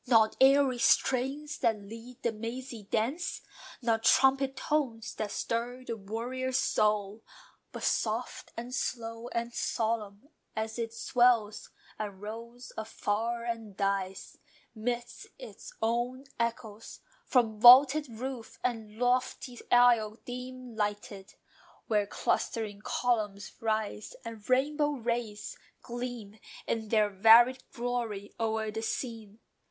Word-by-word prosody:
Not 225 -3 +5
airy 270 -2 +5
strains, 275 +5 +1
that 225 -4 +2
lead 230 +5 -11
the 235 - +2
mazy 230 0 -6
dance; 270 +12 -1 0.4
Not 225 -1 +1
trumpet 270 0 +4
tones, 235 -9 -1
that 215 - -3
stir 240 +4 -3
the 230 - -3
warrior's 245 +5 -3
soul; 210 0 +1 0.5
But - - -7
soft, - - -1
and 240 +2 -6
slow, 230 -2 -3
and 235 -1 -3
solemn, 220 +2 -2 0.3
as 220 +1 -3
it 225 -1 -2
swells 230 -2 +2 0.3
And 205 -3 -5
rolls 230 +4 -8
afar 225 +2 -2
and 225 -4 -5
dies, 195 -1 -2 0.3
midst 240 +1 -4
its - - -10
own 240 +3 0 0.2
echoes 225 -2 -4 0.3
From 225 -4 +2
vaulted 270 +5 +8
roof, 235 0 -6
and 220 -3 -3
lofty 250 0 0
aisle 235 -3 +5
dim 250 -1 -7
lighted, 205 -1 -4 0.5
Where 210 -3 +1
clustering 210 0 -1
columns 215 -5 -1
rise, 215 -1 -2
and 225 -1 -9
rainbow 295 +3 +2
rays 235 -4 -3 0.3
Gleam 240 -4 -6 0.3
in 220 -1 -2
their 215 -2 +3
varied 230 +6 +6
glory 235 -4 -3
o'er 220 -1 -1
the 220 +1 -4
scene. 225 -3 -4
230 Hz, 115 wpm, -30 LUFS, 215-250 Hz, 0.5 s, vaulted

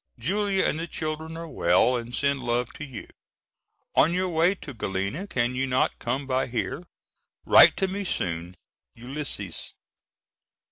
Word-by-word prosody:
Julia 195 - 0
and 155 - 0
the 165 - -3
children 160 0 -4
are 165 0 -6
well 95 - +3
and 120 +1 -4
send 140 -1 +1
love 120 0 -1
to - - -8
you. 130 -4 -9 0.9
On 165 - +4
your 185 0 0
way 170 +3 +3
to 150 -7 -9
Galena 100 - -3
can 120 -7 0
you 135 +1 -1
not 130 0 +1
come 130 +4 -2
by 130 -1 0
here? 125 +7 -3 0.6
Write - - +8
to 190 - +1
me 200 +2 -3
soon. 90 - -3 0.4
ULYSSES. 120 - -4
135 Hz, 150 wpm, -26 LUFS, 120-165 Hz, 0.9 s, Write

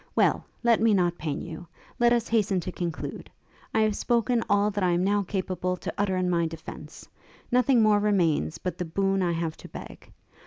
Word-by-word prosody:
Well! - - +3 0.2
let 235 -2 +4
me 225 -2 +4
not 175 -2 +1
pain 150 -3 -3
you. 165 +2 -8 0.3
Let 240 0 +5
us 235 -1 +2
hasten 210 -4 +1
to 185 - -5
conclude. 170 -2 -5 0.4
I 220 - +2
have 215 -1 +2
spoken 235 0 +1
all 205 +1 +3
that 205 -1 -2
I 180 -1 +3
am 175 +1 +1
now 205 +1 +2
capable 185 -2 -2
to - - -5
utter 195 -2 0
of 185 - 0
my 170 -2 +1
defence; 160 0 -10 0.4
nothing 250 -1 +4
more 210 -1 +4
remains 175 - +1
but 180 0 -5
the 180 - -1
boon 195 +3 0
I 175 -2 +1
have 165 -1 -2
to - - -11
beg. - - -11
190 Hz, 200 wpm, -27 LUFS, 175-215 Hz, 0.4 s, Let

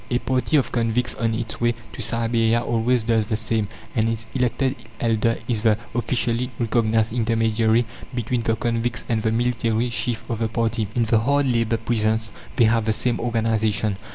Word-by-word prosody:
A 120 - +2
party 130 +4 +1
of 135 - +1
convicts 120 +1 0
on 115 -1 -1
its 115 0 -5
way 120 0 +2 0.2
to - - -6
Siberia 115 +1 +2
always 120 +1 +1
does 110 -2 +1
the 110 - 0
same, 110 -1 0 0.3
and 115 -1 +2
its 115 0 -3
elected 130 +1 0 0.2
elder 115 0 +1
is 115 -4 +1
the 110 -2 +3 0.2
officially 120 +1 0
recognized 115 -1 +1
intermediary 115 0 +2 0.3
between 120 0 -1
the 115 0 +1
convicts 120 +2 -2
and 115 -2 0
the 110 0 +1
military 120 0 0
chief 120 -1 -2
of 115 -2 -3
the 115 - +1
party. 115 -1 -1
In 120 - +3
the 110 0 +3
hard 140 +5 +2
labour 115 -3 +1
prisons 110 -1 0 0.2
they 120 - +5
have 115 0 +2
the 110 - +2
same 120 +2 0
organization. 110 -3 0
115 Hz, 180 wpm, -23 LUFS, 110-120 Hz, 0.3 s, they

